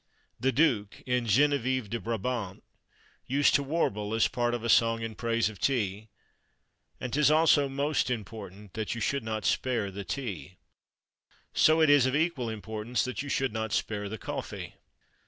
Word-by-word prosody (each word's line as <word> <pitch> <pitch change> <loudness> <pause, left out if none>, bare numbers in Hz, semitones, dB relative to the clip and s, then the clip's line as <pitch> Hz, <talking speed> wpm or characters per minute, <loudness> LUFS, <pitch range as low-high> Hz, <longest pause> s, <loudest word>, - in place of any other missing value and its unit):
"The 135 - +2
Duke" 125 -9 +1
in 125 -1 0
Geneviève 130 0 +2
de 115 +3 -3
Brabant 115 -3 -3 0.6
used 140 +3 +3
to - - +4
warble 110 -8 -1
as 115 - +4
part 120 0 0
of 120 - -5
a - - -1
song 115 0 +3
in 115 -1 -4
praise 115 0 0
of 105 -4 -8
tea 110 -4 -1 0.9
And 125 - -5
'tis 150 0 +4
also 155 -2 +4
most 140 +1 0
important 105 -3 -6
That 110 0 -3
you - - -4
should 140 +4 -1
not 110 -1 -3
spare 115 -6 0
the 100 +1 -6
tea. 95 - -5 1.0
So 160 +1 +5
is 145 -4 +6
it - - +2
of 130 - -1
equal 150 -7 0
importance 110 +1 -3
that 130 +1 -3
you 145 - -6
should 135 -4 0
not 110 -1 -3
spare 105 -2 -2
the 110 - -5
coffee. - - -6
115 Hz, 170 wpm, -29 LUFS, 110-135 Hz, 1.0 s, is